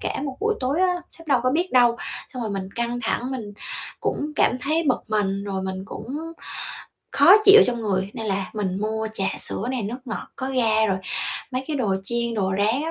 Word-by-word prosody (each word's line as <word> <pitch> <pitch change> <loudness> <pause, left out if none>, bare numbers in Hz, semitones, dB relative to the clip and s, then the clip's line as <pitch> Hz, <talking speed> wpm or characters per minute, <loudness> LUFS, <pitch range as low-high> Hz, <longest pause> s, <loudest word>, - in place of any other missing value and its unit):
cả - - -2
một 270 -3 -4
buổi 440 +1 +2
tối 270 +6 0
á, 365 -1 +3 0.2
sếp 330 - -15
đâu 265 -3 +4
có 255 - +2
biết 345 +6 0
đâu, 240 -2 +5 0.3
xong 250 -2 -6
rồi 220 - -2
mình 195 -1 -3
căng 235 +1 -1
thẳng 240 +3 -1
mình 230 -6 -5 0.5
cũng 300 +1 -2
cảm 250 - +3
thấy 310 +6 +1
bực 250 - +2
mình, 200 -2 0
rồi 195 -2 -3
mình 190 0 -4
cũng 210 +3 -8 1.1
khó - - +7
chịu 420 +2 +10
trong 240 -2 0
người, 195 -2 0
nên 225 - -5
là 195 -2 0
mình 190 -3 -2
mua 220 +1 -1
trà 195 -3 -1
sữa - - 0
này, 255 -3 -1
nước 225 +5 -3
ngọt 230 - -5
có 260 - -3
ga 225 -4 +3
rồi 190 -3 +1 0.5
mấy 255 0 -2
cái 310 - -2
đồ 215 -8 +1
chiên, 235 +2 -1
đồ 190 -3 0
rán 220 +7 +2
á, 320 - -2
235 Hz, 220 wpm, -24 LUFS, 205-260 Hz, 1.1 s, chịu